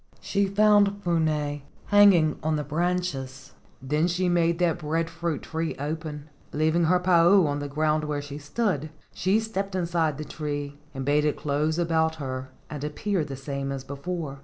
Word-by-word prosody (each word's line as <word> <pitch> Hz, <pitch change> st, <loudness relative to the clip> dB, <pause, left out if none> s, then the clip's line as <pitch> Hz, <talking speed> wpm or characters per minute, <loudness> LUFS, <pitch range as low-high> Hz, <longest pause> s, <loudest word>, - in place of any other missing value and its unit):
She 200 Hz, 0 st, 0 dB
found 205 Hz, 0 st, +3 dB
Puna 155 Hz, -4 st, 0 dB, 0.3 s
hanging 195 Hz, -7 st, +5 dB
on 155 Hz, 0 st, 0 dB
the 150 Hz, -, -1 dB
branches. 150 Hz, -5 st, -2 dB, 0.3 s
Then 150 Hz, +5 st, +1 dB
she 180 Hz, +1 st, 0 dB
made 170 Hz, -1 st, +2 dB
that 175 Hz, -2 st, +1 dB
breadfruit 165 Hz, 0 st, -2 dB
tree 160 Hz, 0 st, -3 dB
open. 150 Hz, 0 st, -5 dB, 0.2 s
Leav¬ 155 Hz, +1 st, +1 dB
ing 170 Hz, 0 st, +3 dB
her 180 Hz, +3 st, +4 dB
pa 180 Hz, -2 st, +4 dB
u 195 Hz, -2 st, +6 dB
on 145 Hz, -1 st, -1 dB
the 145 Hz, -, -4 dB
ground 155 Hz, +1 st, 0 dB
where 150 Hz, -1 st, -2 dB
she 145 Hz, 0 st, -7 dB
stood, 155 Hz, -, -1 dB, 0.2 s
she 195 Hz, +4 st, +2 dB
stepped 200 Hz, -3 st, -3 dB
inside 170 Hz, -4 st, 0 dB
the 155 Hz, -, -5 dB
tree 145 Hz, -1 st, -5 dB, 0.2 s
and 135 Hz, -1 st, -4 dB
bade 145 Hz, +1 st, +3 dB
it 150 Hz, -1 st, 0 dB
close 150 Hz, +2 st, 0 dB
about 160 Hz, -2 st, +1 dB
her 130 Hz, -3 st, -5 dB, 0.2 s
and 145 Hz, -2 st, -7 dB
appear 165 Hz, +4 st, -1 dB
the 140 Hz, -2 st, -6 dB
same 140 Hz, 0 st, -4 dB
as 135 Hz, -1 st, -4 dB
before. 140 Hz, 0 st, -5 dB
155 Hz, 175 wpm, -26 LUFS, 145-175 Hz, 0.3 s, u